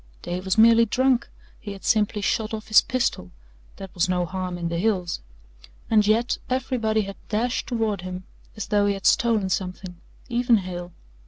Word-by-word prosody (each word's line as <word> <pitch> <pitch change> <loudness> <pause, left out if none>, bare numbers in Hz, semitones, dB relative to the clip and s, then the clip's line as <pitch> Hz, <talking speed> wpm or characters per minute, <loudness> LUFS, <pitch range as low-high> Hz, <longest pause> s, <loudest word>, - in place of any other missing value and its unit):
Dave 180 +2 -4
was 190 +2 0
merely 230 +1 +7
drunk, 260 +2 +1 0.3
he 205 - -7
had 195 - -12
simply 210 -1 +2
shot 220 +2 0
off 215 0 -9
his 215 - +7
pistol 240 - -2 0.5
that 195 -2 -10
was 180 0 0
no 180 -1 +1
harm 185 0 -4
in 170 -1 -3
the 170 0 -2
hills. 185 -4 0 0.7
And 210 -2 +4
yet 230 +3 +2
everybody 245 -4 0
had 195 -1 -6
dashed 235 +3 -1
toward 225 -5 -1
him 185 0 -6 0.3
as 215 - -4
though 205 -1 +3
he 200 - +1
had 195 - -9
stolen 220 -5 +3
something 185 -1 -4 0.3
even 240 -1 +3
Hale. 180 -2 -6
205 Hz, 175 wpm, -24 LUFS, 185-225 Hz, 0.7 s, merely